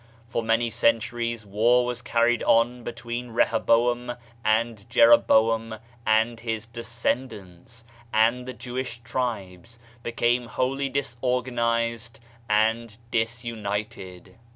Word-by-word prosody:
For 115 - -2
many 115 +1 +1
cenmries, 115 0 0
war 115 +5 +3
was 125 0 -4
carried 120 0 +2
on 120 +1 +2
between 120 0 -6
Reho 115 -1 +2
boam 120 +1 +2 0.3
and 110 0 0
Jeroboam 115 -1 +4 0.3
and 110 +1 +2
his 115 -1 -4
descendants, 115 -3 -5 0.3
and 115 +3 +2
the 130 - -5
Jewish 125 -2 -5
tribes 115 -4 -4 0.2
became 120 +1 0
wholly 135 +4 -1
disorganized 120 -3 -1 0.3
and 110 +1 +1
disunited. 110 -5 -4
115 Hz, 100 wpm, -25 LUFS, 110-120 Hz, 0.3 s, Jeroboam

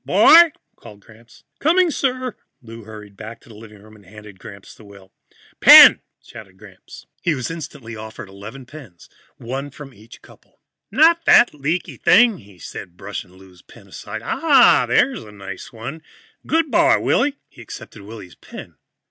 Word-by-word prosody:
"Boy!" 310 - +5 0.3
called 105 -1 -16
Gramps. 115 +2 -21 0.2
"Coming, 345 +3 +1
sir." 255 -4 -3 0.2
Lou 115 -3 -14
hurried 105 -2 -13
back 110 +3 -11
into - - -24
the - - -14
living 105 -1 -16
room 110 0 -18
and 105 - -20
handed 105 0 -15
Gramps 100 0 -14
the - - -19
will. 100 -2 -18 0.5
"Pen!" - - +8 0.2
said 95 -4 -15
Gramps. 95 -2 -16 0.2
He 170 - -1
was 130 +2 -6
instantly 140 -8 -10
offered 110 0 -11
eleven 105 +7 -12
pens, 125 - -15 0.3
one 135 +4 -7
from 140 -1 -13
each 110 +2 -18
couple. - - -22 0.3
"Not 330 +7 +2
that - - +4
leaky 150 +5 -5
thing," 220 -1 +3
he 100 -2 -19
said, 90 0 -11
brushing 95 -2 -9
Lou's 95 -1 -19
pen - - -19
aside. - - -9
"Ah, - - +3
there's - - 0
a 105 - -15
nice 100 -2 -11
one. 125 +8 -9 0.5
Good 325 -3 -1
boy, 335 0 +3
Willy." 285 0 -1
He 125 - -17
accepted 110 -1 -12
Willy's 100 -3 -13
pen. - - -14
115 Hz, 165 wpm, -19 LUFS, 100-165 Hz, 0.5 s, Pen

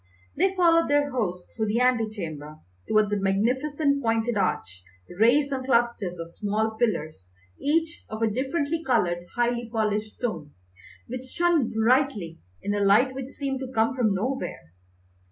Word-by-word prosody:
They 380 +5 +2
followed 335 -2 +4
their 290 0 +2
host 180 -8 -3
through 220 -1 -1
the 215 +3 +1
ante 250 -3 +2
chamber 155 -7 -7 0.3
towards 215 -1 +2
a - - +2
magnificent 265 +9 +1
pointed 225 0 0
arch 95 - -1 0.4
raised 275 +5 +4
on 260 -1 -2
clusters 235 -8 +1
of 165 0 -6
small 215 +4 -1
pillars 155 - -2 0.3
each 320 +3 0
of 220 +1 -3
a - - +4
differently 285 +7 -1
coloured, 175 - 0
highly 240 -1 0
polished 215 -1 -1
stone, 165 - -4 0.5
which 255 +2 -6
shone 335 -2 +1
brilliantly 220 - +1 0.2
in 205 - -1
a 205 0 0
light 215 +7 +4
which 260 -1 -5
seemed 270 -1 -4
to 260 -1 -6
come 225 +2 +1
from 220 -6 +2
nowhere. 215 - -4
235 Hz, 155 wpm, -26 LUFS, 205-270 Hz, 0.5 s, followed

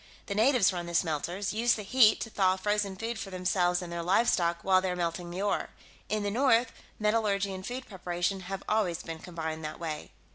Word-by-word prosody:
The 200 - -3
natives 220 -2 +4
run 175 -1 -4
the 170 - -5
smelters; 175 +5 -1
use 230 +2 +3
the 210 - -6
heat 220 +1 +5
to 225 - -4
thaw 190 -2 +3
frozen 205 0 0
food 225 +3 -4
for 195 - -5
themselves 180 -1 +1
and 170 -1 -7
their 170 - -2
livestock 175 -2 +2
while 190 -1 +4
they're 185 -1 -1
melting 175 0 -2
the 180 +3 -4
ore. 205 - 0 0.4
In 215 -1 0
the 205 - -1
north, 240 0 +3 0.3
metallurgy 210 -2 +1
and 185 0 -7
food 250 +5 -5
preparation 180 -1 -2
have 190 +1 -6
always 200 -6 0
been 165 -1 -6
combined 160 -2 -5
that 155 - -6
way." 160 -3 -5
190 Hz, 205 wpm, -29 LUFS, 175-210 Hz, 0.4 s, heat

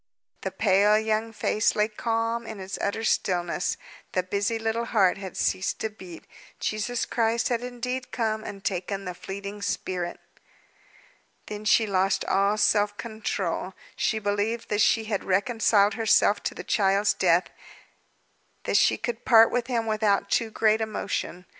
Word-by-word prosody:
The 190 - -2
pale 200 +2 +3
young 220 +1 -1
face 215 -1 +1
lay 210 0 +2
calm 230 +1 -2
in 215 - -7
its 190 0 -6
utter 210 +3 -2
stillness; 175 -4 0 0.4
the 185 - +1
busy 200 +4 -1
little 225 +1 -1
heart 195 -5 +2
had 190 -2 -7
ceased 185 - 0
to 220 - -2
beat. 185 -5 -11 0.4
Jesus 215 +3 -2
Christ 230 0 0
had 240 -2 0
indeed 250 +1 -5
come 220 -2 -1
and 200 -2 -8
taken 195 +1 -2
the 180 - -4
fleeting 200 +3 -7
spirit. 180 -2 -3 1.3
Then 210 0 -7
she 220 +1 +4
lost 195 -1 +1
all 200 +2 +2
self 205 0 +2
control. 195 -5 -3 0.2
She 220 - 0
believed 205 +2 -2
that 210 0 +1
she 225 - +3
had 210 -2 -2
reconciled 205 +1 +2
herself 210 -1 +3
to - - -2
the - - -7
child's 200 0 +2
death, 175 -1 +2 1.1
that - - +2
she - - +4
could 240 -1 -4
part 225 -2 +6
with 240 -1 -1
him 235 -3 -1
without 210 -2 +1
too 230 -2 +1
great 220 0 +2
emotion. 200 -4 -3
210 Hz, 155 wpm, -26 LUFS, 195-225 Hz, 1.3 s, part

